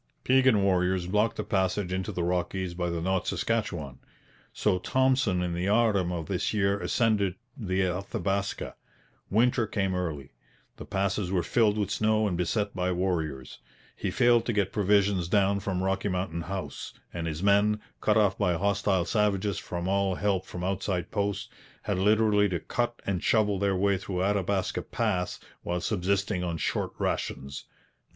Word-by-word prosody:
Piegan 130 -5 +4
warriors 90 -1 +2
blocked 105 +4 +1
the - - -2
passage 95 -1 0
into 95 0 -2
the 90 - -2
Rockies 90 +1 -1
by 90 0 -2
the 85 -1 -2
North 95 0 0
Saskatchewan; 85 - -2 0.5
so 95 -4 +1
Thompson 130 -6 +2
in 90 -1 -2
the 90 +2 -2
autumn 105 -4 +2
of 85 -3 -3
this 110 - -1
year 100 -1 +2
ascended 100 0 +1 0.2
the 95 -8 -1
Athabaska. 100 +2 -2 0.6
Winter 120 +2 +2
came 95 -3 -1
early. 80 -7 -3 0.5
The - - -9
passes 95 -1 -1
were 90 -3 +1
filled 110 -3 +2
with 105 -2 -1
snow 110 0 +2
and 90 - -1
beset 100 +4 -1
by 90 0 0
warriors. 80 -7 -2 0.4
He 100 - -3
failed 120 +3 +4
to 120 - +1
get 100 -3 +1
provisions 100 -3 +2
down 100 +1 +2
from 95 -2 -2
Rocky 95 +2 0
Mountain 90 -2 -2
House; 95 +2 -6 0.2
and 85 -1 -3
his 80 +2 -4
men, 100 +1 +4 0.2
cut 105 0 +3
off 105 -2 +3
by 90 -4 +2
hostile 100 -1 +1
savages 100 -1 +1
from 85 0 -4
all 100 -1 +1
help 95 -1 0
from 90 - -6
outside 95 -1 -2
posts, 100 -1 -1 0.4
had 100 -3 -1
literally 105 0 +4
to 90 -2 -1
cut 120 +8 -2
and 95 -3 -1
shovel 105 -3 +2
their 100 -1 +1
way 100 0 +2
through 90 -1 -3
Athabaska 100 -1 0
Pass 100 -6 -2 0.2
while 90 0 -2
subsisting 95 0 0
on 85 -2 -2
short - - -2
rations. 70 +1 -3
95 Hz, 160 wpm, -28 LUFS, 90-105 Hz, 0.6 s, Piegan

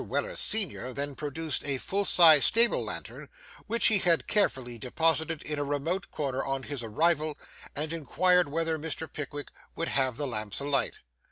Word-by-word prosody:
Weller, - - -3
senior, 190 - +2
then 140 +1 -2
produced 150 +1 -3
a 140 -2 -1
full 200 +9 -2
sized 160 -6 +8
stable 235 +1 +3
lantern, - - -7 0.4
which 230 +2 +1
he 210 -3 +5
had 170 -3 +1
carefully 130 - 0
deposited 160 +5 -1
in 150 -1 -4
a - - -1
remote 145 +6 -3
corner, 135 -3 -3
on 135 -1 -3
his 145 -3 -5
arrival, 155 +6 0 0.4
and 155 +2 -3
inquired 180 +3 +1
whether 160 +2 -2
Mr. 160 +1 -5
Pickwick 145 -1 -7 0.3
would 165 - -3
have 130 -3 0
'the 145 - -2
lamps 110 -5 -4
alight. 140 -1 -1
150 Hz, 165 wpm, -27 LUFS, 140-165 Hz, 0.4 s, sized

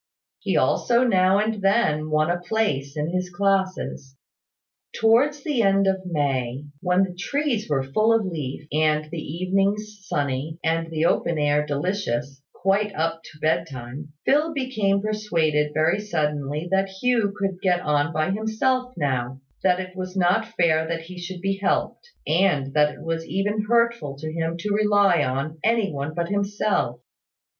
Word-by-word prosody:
He - - 0
also 240 +1 +3
now 190 -5 +4
and 215 0 0
then 195 -7 +2
won 155 +2 +2
a 175 0 -2
place 155 -10 -1
in 150 +3 -1
his 185 0 -2
classes. 190 -7 -1 0.8
Towards 265 +6 +3
the 285 -6 +1
end 195 -1 +3
of 190 -1 0
May, 135 -4 -1 0.2
when 180 +1 +3
the 185 -2 -3
trees 240 - -1
were 135 -3 +1
full 215 +12 +2
of 225 -2 +3
leaf, 150 -6 -5
and 155 0 +2
the 170 -2 -4
evenings 195 +6 -1
sunny, 145 +2 -2
and 165 0 0
the 160 0 0
open 170 -1 +1
air 150 0 +2
delicious, 140 -5 -2
quite 195 +2 0
up 165 +1 -1
to 155 - -14
bedtime, 150 -3 -2
Phil 300 +4 +3
became 215 -7 0
persuaded, 165 -9 0
very 155 +6 +2
suddenly, 150 -5 -2
that 195 0 +2
Hugh 220 +1 +1
could 195 -2 -2
get 180 -2 +2
on 150 -1 +1
by 155 +3 0
himself 250 +5 0
now; 130 -4 -1 0.2
that 180 -1 +3
it 185 0 -6
was 185 0 -5
not 220 +6 +1
fair 160 -2 +3
that 165 0 -3
he 180 +2 -10
should 175 0 -7
be 195 +1 -1
helped; 200 - -1 0.2
and 150 -5 +2
that 150 -1 +4
it - - -12
was 165 0 -2
even 205 +2 -1
hurtful 235 -12 +1
to 155 +2 -6
him 165 0 -2
to 210 +2 -1
rely 205 -5 +4
on 140 +4 -3
any 225 -3 +2
one 145 +3 -4
but 170 -1 -2
himself. 200 - 0
180 Hz, 160 wpm, -24 LUFS, 155-205 Hz, 0.8 s, now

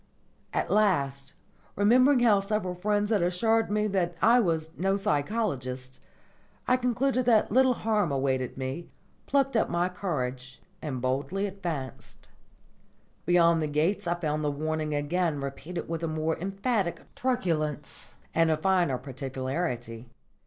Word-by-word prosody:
At - - -1
last, 140 -10 +1 0.4
remembering 250 +6 +5
how 215 -4 +5
several 195 -2 -2
friends 205 +3 0
had 210 -4 +3
assured 220 +6 +2
me 210 +1 +1
that 175 -3 0
I 240 +6 +5
was 160 -6 0
"no 195 +2 +1
psychologist," 140 - -2 0.7
I 250 - +5
concluded 250 0 0
that 220 -5 +4
little 260 +2 +4
harm 215 -8 0
awaited 130 -2 -1
me, 135 +6 -4 0.4
plucked 275 -2 +1
up 220 - +2
my 175 +1 +1
courage, 130 -9 -4 0.2
and 130 -5 -4
boldly 140 +10 -1
advanced. 170 -10 -6 1.0
Beyond 170 -2 +4
the 155 - 0
gates 155 +6 0
I 170 - +1
found 155 -3 -2
the 150 - +1
warning 155 +1 -2
again 150 +1 0
repeated 140 +6 -5
with 165 0 -3
a 165 - -1
more 155 0 -1
emphatic 195 +1 -2
truculence 155 - -2 0.2
and 165 0 +3
a 155 - +2
finer 175 -5 +2
particularity. 130 -2 -4
170 Hz, 135 wpm, -28 LUFS, 145-205 Hz, 1.0 s, remembering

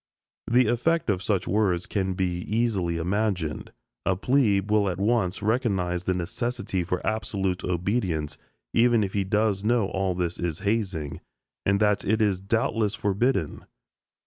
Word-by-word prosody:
The 125 +2 +5
effect 120 +4 +1
of 95 -2 -1
such 100 -2 0
words 95 -4 +1
can 95 -2 -1
be 90 -2 -1
easily 100 -5 0
imagined. 90 -2 -1 0.3
A 95 - +1
"plebe" 105 -2 +2
will 105 -2 +3
at 90 - -3
once 100 -2 0
recognize 95 -6 0
the 95 - +1
necessity 95 +1 -2
for 90 +1 -3
absolute 95 -3 -1
obedience, 90 -4 -1 0.3
even 115 -1 +4
if 95 - -3
he 100 - +1
does 105 0 +1
know 110 -2 +2
all 95 -1 -1
this 90 -1 -2
is 85 -3 -3
hazing, 95 -9 -1 0.5
and 100 0 +3
that 105 -1 +2
it 110 +3 +1
is 100 -4 +1
doubtless 110 0 0
forbidden. 100 - 0
100 Hz, 145 wpm, -26 LUFS, 90-110 Hz, 0.5 s, The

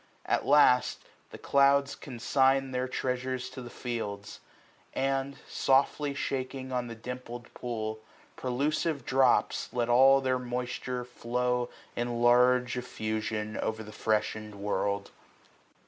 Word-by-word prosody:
At - - 0
last. 135 -3 +5 0.3
The - - -10
clouds 140 0 +3
coniign 135 +1 +1
their 130 0 -1
treasures 130 0 -2
to 130 0 -8
the 120 - -8
fields; 110 -5 -5 0.6
And, 135 +1 -1
softly 140 +1 +2
shaking 130 -1 -3
on 125 -1 -1
the 115 - -7
dimpled 120 +1 -8
pool 110 -3 -4 0.4
Prelusive 145 +4 -1
drops, 130 -1 +2
let 120 -1 -1
all 135 +3 +7
their 130 -1 0
moifhire 125 0 -3
flow 125 0 -1 0.3
In 120 0 -2
large 125 +1 +4
effusion, 110 -2 -3
o*er 110 0 -2
the 105 - -10
freshened 105 0 -1
world. 100 0 -2
125 Hz, 115 wpm, -29 LUFS, 115-130 Hz, 0.6 s, all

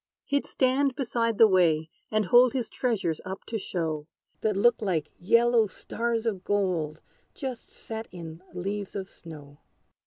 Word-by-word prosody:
He'd 285 -1 0
stand 265 0 +2
beside 230 -4 0
the 225 - +8
way, 165 -5 +3 0.2
and 215 -1 +1
hold 245 +4 +6
His 250 -4 -2
treasures 205 -10 -1
up 190 +1 -7
to 225 - -3
show, 160 -5 -3 0.3
That 215 -3 0
looked 235 +3 +4
like 170 -7 -1
yellow 230 +3 +4
stars 230 +4 -2
of 200 -5 -1
gold 180 -7 0 0.3
Just 260 -4 -6
set 225 0 -7
in 165 -2 -9
leaves 195 +3 -4
of 195 -1 -5
snow. 145 -3 -11
205 Hz, 150 wpm, -27 LUFS, 175-235 Hz, 0.3 s, the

